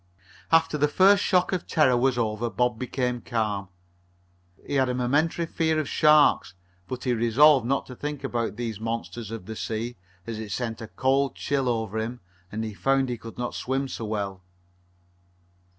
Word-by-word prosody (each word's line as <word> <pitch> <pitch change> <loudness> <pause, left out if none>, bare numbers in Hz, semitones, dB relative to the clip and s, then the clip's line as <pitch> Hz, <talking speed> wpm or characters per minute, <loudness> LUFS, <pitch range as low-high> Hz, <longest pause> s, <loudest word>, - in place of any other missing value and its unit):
After 165 -2 +3
the 150 - +4
first 195 +6 +5
shock 185 0 +2
of 180 - -2
terror 140 -7 +3
was 125 +1 +2
over 115 0 -1
Bob 125 -1 0
became 125 -1 -2
calm. 105 -4 -2 1.0
He - - -5
had 130 -2 +2
a 125 - -1
momentary 145 +7 +1
fear 160 -1 0
of 155 - -2
sharks, 150 -12 +4 0.3
but 125 - -5
he 125 - +1
resolved 120 +3 +5
not 135 +1 0
to 125 - -10
think 145 +1 -5
about 120 -5 -2
these 115 -3 -4
monsters 115 0 -4
or 115 - -3
the 110 +2 -9
sea, 115 +2 -4 0.3
as 115 -2 -5
it 110 -2 -6
sent 115 +1 -3
a 115 - -6
cold 135 +3 +1
chill 135 -3 -1
over 110 -2 -1
him 120 +3 -4 0.3
and 110 +1 -3
he 110 -1 -4
found 135 +4 +1
he 120 - -2
could 115 0 -10
not 120 -1 -3
swim 135 +2 -2
so 115 - -5
well. 100 -3 -3
125 Hz, 180 wpm, -26 LUFS, 110-140 Hz, 1.0 s, first